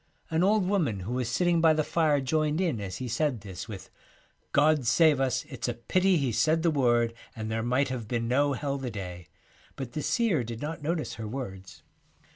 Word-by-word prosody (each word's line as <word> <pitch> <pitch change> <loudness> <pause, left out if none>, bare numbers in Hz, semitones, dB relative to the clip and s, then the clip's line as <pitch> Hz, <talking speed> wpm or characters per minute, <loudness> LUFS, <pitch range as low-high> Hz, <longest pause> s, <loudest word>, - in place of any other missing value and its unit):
An 160 +2 +2
old 205 0 +3
woman 155 - 0
who 105 +7 -4
was 125 -2 -1
sitting 170 +7 +2
by 160 -1 +6
the 155 0 +1
fire 155 -2 +2
joined 155 +3 0
in 160 - 0
as 95 -1 -5
he 130 - -4
said 125 -1 0
this 95 -1 -8
with 100 -4 -9 0.3
' - - -38
God 150 -4 +3
save 150 +4 +5
us, 130 -1 0
it's 130 -5 -5
a 120 - -2
pity 185 +10 +2
He 135 -5 0
said 160 +8 +2
the 170 - +3
word, 120 -5 +2 0.2
and 110 0 -4
there 110 0 -1
might 125 +4 +1
have 120 -4 -4
been 115 0 -1
no 140 +4 +2
Hell 140 +1 -2
the 130 -2 -4
day,' 90 -5 -7 0.5
but 130 -3 -6
the 150 - -2
seer 210 - +1
did 115 0 -6
not 155 +2 -5
notice 160 +1 -2
her 110 - -4
words. 95 -6 -7
130 Hz, 215 wpm, -28 LUFS, 115-155 Hz, 0.5 s, by